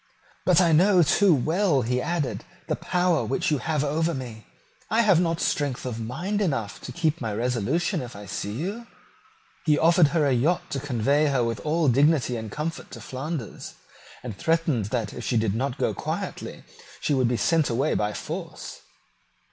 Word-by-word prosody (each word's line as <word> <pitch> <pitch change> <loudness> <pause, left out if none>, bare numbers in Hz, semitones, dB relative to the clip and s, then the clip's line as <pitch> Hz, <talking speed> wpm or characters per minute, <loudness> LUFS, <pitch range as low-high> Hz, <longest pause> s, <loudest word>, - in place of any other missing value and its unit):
"But 180 -2 +6
I 175 -3 +4
know 180 +3 +5
too 185 +6 +4
well," 155 +1 +1
he 125 +2 0
added, 165 -3 -2 0.2
"the - - -1
power 180 -2 +1
which 135 - -1
you 150 - +1
have 150 +1 -1
over 160 +3 0
me. 120 -4 -8 0.4
I 225 +2 +3
have 200 -7 +4
not 165 -2 0
strength 140 -4 -1
of 120 -3 -4
mind 175 - -3
enough 135 - -2
to - - -7
keep 160 -2 -1
my 115 -3 -2
resolution 125 - 0
if 120 -3 -8
I 100 0 -9
see 100 +2 -4
you." 195 - -4 0.8
He 150 -2 +3
offered 165 0 +5
her 155 0 +1
a 140 - +3
yacht 150 +9 0
to 140 - -1
convey 140 +3 +1
her 135 -4 +1
with 115 -1 -2
all 155 +1 0
dignity 140 0 +3
and 110 -2 -5
comfort 155 +6 -4
to - - -8
Flanders, 135 -2 -6 0.5
and 120 -5 -6
threatened 165 - +1
that 105 -1 -2
if - - -7
she 120 - 0
did 110 -3 +1
not 130 +4 -2
go - - 0
quietly - - -5 0.4
she 150 - 0
should 130 -3 +2
be 120 0 0
sent 165 +2 +2
away 130 +6 +1
by 105 0 0
force. - - -7
145 Hz, 185 wpm, -25 LUFS, 120-165 Hz, 0.8 s, But